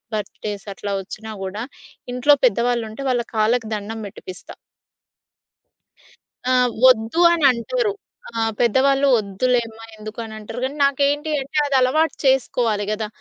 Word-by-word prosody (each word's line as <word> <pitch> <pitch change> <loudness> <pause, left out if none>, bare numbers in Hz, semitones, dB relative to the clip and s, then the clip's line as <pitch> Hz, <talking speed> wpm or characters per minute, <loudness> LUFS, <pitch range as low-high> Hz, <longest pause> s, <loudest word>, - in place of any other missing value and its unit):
Birthdays 205 0 -5
అట్లా 200 +1 -5
వచ్చినా 220 +3 -9
గూడా 205 +4 -4 0.5
ఇంట్లో 270 +4 +5
పెద్దవాళ్ళు 240 +1 +1
ఉంటే 245 +6 -7
వాళ్ళ 245 -2 +1
కాళ్ళకి 220 +1 +1
దండం 215 +2 -6
పెట్టిపిస్తా. 185 -1 -11 2.0
ఆ! - - +4 0.3
వద్దు 240 +5 +4
అని 320 -4 +1
అంటారు. 415 - -1 0.4
ఆహ్, 225 0 0
పెద్దవాళ్ళు 270 +4 +3
వద్దులేమ్మా 225 +2 -1
ఎందుకు 215 +2 -9
అని 220 -1 -9
అంటారు 225 +3 -7
కానీ. 265 +2 -2
నాకేంటి 285 +2 +1
అంటే 285 +3 -6
అది 280 -1 0
అలవాటు 310 +6 +2
చేసుకోవాలి 240 -5 +1
కదా! 215 0 -2
235 Hz, 125 wpm, -21 LUFS, 215-270 Hz, 2.0 s, ఇంట్లో